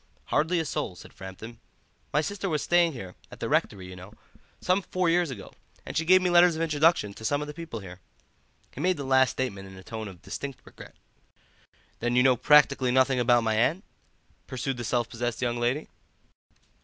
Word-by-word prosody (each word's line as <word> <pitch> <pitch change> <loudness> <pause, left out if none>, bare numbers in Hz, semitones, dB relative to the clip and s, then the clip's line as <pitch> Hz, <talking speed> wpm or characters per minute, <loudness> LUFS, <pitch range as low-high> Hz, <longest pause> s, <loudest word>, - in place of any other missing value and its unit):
"Hardly 165 +4 +2
a 160 - -1
soul," 95 -9 -3
said - - -14
Framton. 95 +5 -9 0.5
"My 150 - +2
sister 200 +3 -3
was 150 -3 -1
staying 175 -2 +3
here, 95 -8 -8 0.2
at - - -12
the - - -3
rectory, 95 -2 0
you 90 0 -9
know, 90 +3 -12 0.5
some 185 +2 +1
four 180 -2 0
years 175 -1 +2
ago, 115 -7 -9 0.3
and - - -7
she 160 - 0
gave 185 +2 +6
me 180 - +1
letters 175 -1 +6
of 160 - -3
introduction 155 -8 +2
to 110 - -12
some 145 +6 +1
of 150 - -5
the 150 - -7
people 155 -8 -7
here." 90 -1 -10 0.7
He 135 - -7
made 180 +1 +1
the 140 - -4
last 130 -1 +4
statement 100 -7 -4
in 95 - -12
a 95 - -12
tone 110 0 -6
of 90 -4 -12
distinct 140 -2 -6
regret. - - -14 1.0
"Then 120 +1 -1
you 125 - +5
know 130 -1 +5
practically 140 0 +4
nothing 130 +1 +3
about 120 -1 +4
my 110 -1 +1
aunt?" 140 - +1 0.6
pursued 130 0 -3
the 120 - -5
self 120 0 0
possessed 120 0 -3
young 120 -1 -1
lady. 120 +6 -1
130 Hz, 205 wpm, -27 LUFS, 115-160 Hz, 1.0 s, gave